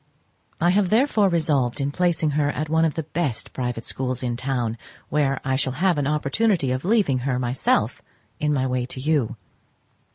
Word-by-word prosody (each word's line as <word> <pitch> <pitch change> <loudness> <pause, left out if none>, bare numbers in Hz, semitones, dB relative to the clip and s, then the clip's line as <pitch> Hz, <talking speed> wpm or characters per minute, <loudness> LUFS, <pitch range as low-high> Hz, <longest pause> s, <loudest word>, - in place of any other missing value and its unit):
I 175 +2 +3
have 190 -1 +2
therefore 220 -3 +3
resolved 150 -7 +1
on 140 0 -1
placing 170 -2 +1
her 145 0 +1
at 150 +1 -3
one 160 +1 +3
of 160 - -1
the 160 - -2
best 150 -5 -3
private 125 -3 -3
schools 130 -1 -3
in 120 -1 -1
town, 120 -3 -2 0.3
where 140 -2 +1
I 130 -1 +1
shall 130 -1 0
have 175 +2 +1
an 140 - 0
opportunity 150 - +1
of 130 +1 -2
leaving 195 - +2
her 125 0 -1
myself 125 +1 0 0.4
in 150 0 +1
my 135 -3 +1
way 125 -1 -1
to 130 - -7
you. 140 -5 0
140 Hz, 185 wpm, -23 LUFS, 130-165 Hz, 0.4 s, I